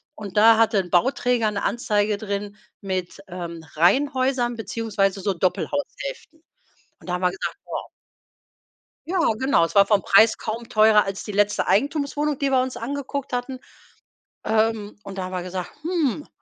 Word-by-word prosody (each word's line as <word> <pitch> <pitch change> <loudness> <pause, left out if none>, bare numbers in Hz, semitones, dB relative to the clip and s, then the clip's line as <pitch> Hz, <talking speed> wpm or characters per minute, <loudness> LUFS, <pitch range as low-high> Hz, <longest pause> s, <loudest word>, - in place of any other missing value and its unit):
und 205 -2 -8
da 225 +1 +7
hatte 225 -2 +3
'n 180 -2 -3
Bauträger 240 +2 +2
'ne 205 - -3
Anzeige 210 -3 0
drin 205 0 -4 0.3
mit, 185 -2 -4
ähm, 170 -2 -7
Reihenhäusern 255 - +2
beziehungsweise 205 -2 -1
so 200 -1 0
Doppelhaushälften. 315 - -3 0.6
Und - - -16
da - - -1
haben 180 - -4
wir 180 - +3
gesagt: 190 - -5
„Boah.“ - - -6 1.2
Ja 370 +3 -1 0.2
genau, 265 -10 +3
es - - -8
war 200 0 +7
vom 205 -1 +3
Preis 220 +4 +5
kaum 230 +2 -5
teurer 215 -2 +5
als 195 0 -5
die 210 - -6
letzte 205 0 +1
Eigentumswohnung, 285 - 0
die 280 -1 +1
wir 260 -1 +4
uns 255 0 -4
angeguckt 280 +2 -5
hatten. 255 +1 -3 0.8
Ähm, 220 -1 0
und 195 0 -9
da 190 - -2
haben 185 - -7
wir 180 -1 -3
gesagt: 185 0 -5
„Hm.“ 315 -5 -1
215 Hz, 160 wpm, -23 LUFS, 195-260 Hz, 1.2 s, da